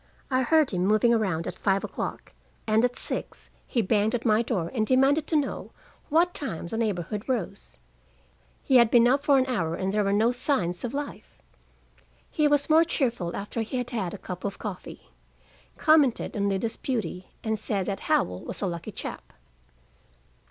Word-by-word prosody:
I 255 0 +3
heard 310 +2 +3
him 180 -2 -1
moving 215 +3 +4
around 185 -8 0
at - - -4
five 195 -1 0
o'clock, - - -5 0.3
and 220 +1 +3
at 245 0 +1
six - - -5 0.2
he 235 -4 0
banged 210 +3 +2
at 235 - -4
my 215 -1 +4
door 200 -8 -2
and 225 -4 +1
demanded 275 +4 +3
to 320 - -1
know 290 -2 -1 0.4
at - - -32
what 345 +3 +3
time 220 - -5
the 170 - -5
neighborhood 210 0 -2
rose: 200 -6 -3 0.9
he 260 - +5
had 235 -2 +6
been 240 0 +5
up 270 +3 +2
for 285 -2 +4
an 260 - +3
hour 170 -11 -1
and 190 +2 -2
there 210 0 +2
were 200 - +1
no 220 +4 +3
signs 210 - 0
of 245 +2 -3
life. 285 -7 -6 0.9
He 300 -1 +2
was 290 -1 +2
more 320 +1 +6
cheerful 240 - -1
after 205 +3 -4
he 225 +4 -3
had 245 -1 -3
had 205 -6 -3
a - - -7
cup 180 -1 -8
of 200 -1 -3
coffee, 200 -4 -8 0.7
commented 300 -9 +3
on 200 -1 +1
Lida's 210 +4 -2
beauty, 220 -8 -3 0.2
and 220 -1 -1
said 195 -3 -2
that 195 0 -3
Howell 90 0 0
was - - -6
a - - +2
lucky 170 -2 -4
chap. - - -8
225 Hz, 185 wpm, -26 LUFS, 195-260 Hz, 0.9 s, had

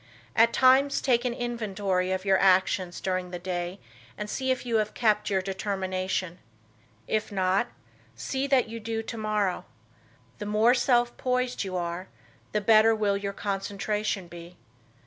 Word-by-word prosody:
At 230 +1 +5
times 265 +2 +4
take 245 -2 +1
an 245 - 0
inventory 200 -6 -1
of 190 +1 -2
your 190 -1 +4
actions 185 -1 +2
during 185 -1 -2
the 180 - -5
day 175 +1 -4 0.4
and 210 - -4
see 260 +4 -3
if 255 -1 0
you 230 -2 +1
have 215 -1 -1
kept 210 -3 +2
your 190 -2 +1
determination. 190 -2 -3 0.7
If 215 0 -1
not, 190 +4 +1 0.5
see 265 - -2
that 265 -4 +3
you 230 +1 -6
do 225 0 -3
tomorrow. 215 -4 -1 0.8
The 210 - -5
more 215 +3 +4
self 240 -1 +2
poised 250 -1 -1
you 185 -2 -3
are 175 +1 -4 0.4
the 210 - 0
better 220 +2 +5
will 205 -2 +1
your 200 0 -3
concentration 200 0 -2
be. 170 +1 -11
205 Hz, 150 wpm, -27 LUFS, 185-230 Hz, 0.8 s, At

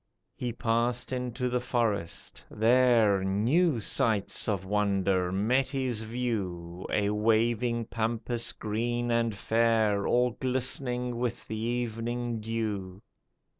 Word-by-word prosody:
He 125 -1 -3
passed 120 +2 0
into 125 0 -2
the 125 0 0
forest, 115 -8 -2
there 115 -4 +4
New 120 - +2
sights 105 0 0
of 95 -3 -1
wonder 95 -2 +1
met 115 +8 +2
his 130 -5 -1
view, 95 -7 -4
A 105 -1 +1
waving 115 +2 +1
Pampas 115 +1 -2
green 120 +3 -2
and 115 -2 +1
fair 110 -1 +2
All 125 0 +3
glistening 125 -1 -1
with 120 -1 -3
the 110 - -4
evening 120 0 -2
dew. 105 -3 -3
115 Hz, 110 wpm, -29 LUFS, 105-120 Hz, -, there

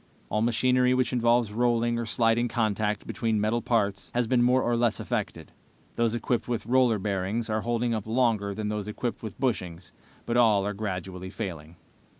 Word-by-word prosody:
"All 105 - 0
machinery 125 +2 +3
which 130 -2 0
involves 120 -2 +2
rolling 120 0 +1
or 115 - -3
sliding 115 +1 +2
contact 105 -3 -1
between 110 -2 -1
metal 110 +3 0
parts 100 -5 0
has 120 0 +2
been 120 +1 +2
more 125 +2 +3
or 120 - +1
less 115 -2 +1
affected. - - -4 0.4
Those 115 -1 +1
equipped 120 0 -1
with 120 -3 -2
roller 125 -2 +3
bearings 100 +3 -2
are 110 0 0
holding 120 +1 0
up 110 -2 -3
longer 110 -4 +1
than 110 -1 -3
those 105 -1 -3
equipped 115 +3 -4
with 110 +1 -8
bushings, 90 -9 -2 0.3
but 120 - 0
all 110 -5 +4
are 105 - -2
gradually 95 -2 -5
failing. 85 -6 -6
115 Hz, 175 wpm, -27 LUFS, 105-120 Hz, 0.4 s, all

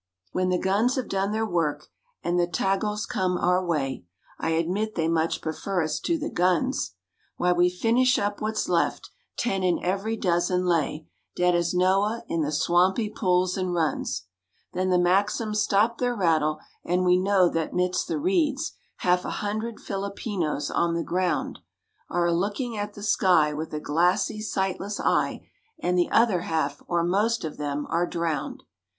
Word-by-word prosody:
When 185 0 0
the 180 - +2
guns 205 +8 +1
have 260 - -2
done 195 +1 -1
their 220 +1 0
work, 170 -7 -1 0.4
and 175 +1 +1
the 175 - +2
Tagals 195 +5 -1
come 180 -1 0
our 180 +1 +2
way, 145 - -2 0.4
(I - - -1
admit 180 +7 -1
they 160 -1 0
much 165 0 0
prefer 175 +3 -2
us 155 -1 -2
to 335 - 0
the 315 0 -4
guns,) 175 - +1 0.4
Why, 180 - +2
we 175 0 +4
finish 235 +8 +2
up 205 0 -2
what's 215 0 -1
left—ten 195 -5 -2
in 180 -2 +2
every 200 +5 -1
dozen 180 -1 +1
lay 160 -3 0 0.3
Dead 180 0 +3
as 175 0 +1
Noah, 195 +5 +2
in 165 - -1
the 150 0 -1
swampy 180 +7 +2
pools 185 -3 +1
and 185 -2 -1
runs; 155 - -1 0.5
Then 185 +1 0
the 180 - +4
Maxims 205 +4 +1
stop 220 +4 +2
their 245 -1 0
rattle 160 -6 +2 0.3
and 180 +1 +1
we 180 0 +4
know 190 -1 +4
that 165 -2 -2
midst 180 0 0
the 335 - -1
reeds, 310 -3 0 0.3
Half 180 0 +2
a - - -4
hundred 215 +2 -3
Filipinos 195 -6 -3
on 170 0 +1
the 170 - -1
ground 180 0 -1 0.5
Are 175 0 +1
a 170 - +2
looking 205 +7 -1
at 205 0 -4
the 205 - -9
sky, 180 -7 +3
with 155 +2 -5
a 150 - -3
glassy, 175 +7 +1
sightless 195 0 -2
eye, - - 0 0.3
And 180 0 0
the 175 -1 +2
other 225 -6 +3
half—or 160 +1 -1
most 205 +6 +1
of 155 - -6
them—are 150 +4 -1
drowned. 165 -3 -3
180 Hz, 165 wpm, -26 LUFS, 170-210 Hz, 0.5 s, we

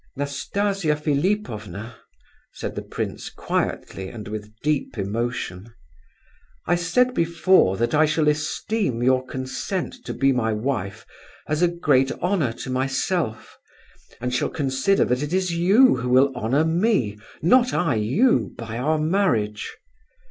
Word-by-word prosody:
"Nastasia 155 +5 -1
Philipovna." 140 - -2 0.6
said - - -5
the - - -4
prince, - - -5
quietly, 95 -1 -3
and 105 -1 -8
with 105 0 -6
deep 145 -4 -1
emotion, 110 0 -3 0.9
"I 175 - +2
said 210 +9 +2
before 170 - +3
that 120 +4 0
I 155 +1 +4
shall 155 0 +1
esteem 150 - -1
your 130 0 +3
consent 130 +9 -4
to - - -5
be 135 0 +3
my 115 -4 0
wife 105 -4 -3 0.4
as 155 +2 -1
a 175 - +5
great 145 -6 +2
honour 180 - 0
to 130 - -5
myself, 135 0 -1 0.6
and 125 +1 -3
shall 125 - 0
consider 135 +6 +1
that 125 +2 0
it 150 +3 -3
is 185 -2 +1
you 190 - +5
who 125 +1 -3
will 130 +2 +4
honour 135 +8 +1
me, 160 - +1 0.2
not 250 +8 +5
I 165 -7 +1
you, 130 - +2
by 115 0 -5
our 155 +5 +1
marriage. 150 - 0
140 Hz, 135 wpm, -23 LUFS, 120-175 Hz, 0.9 s, a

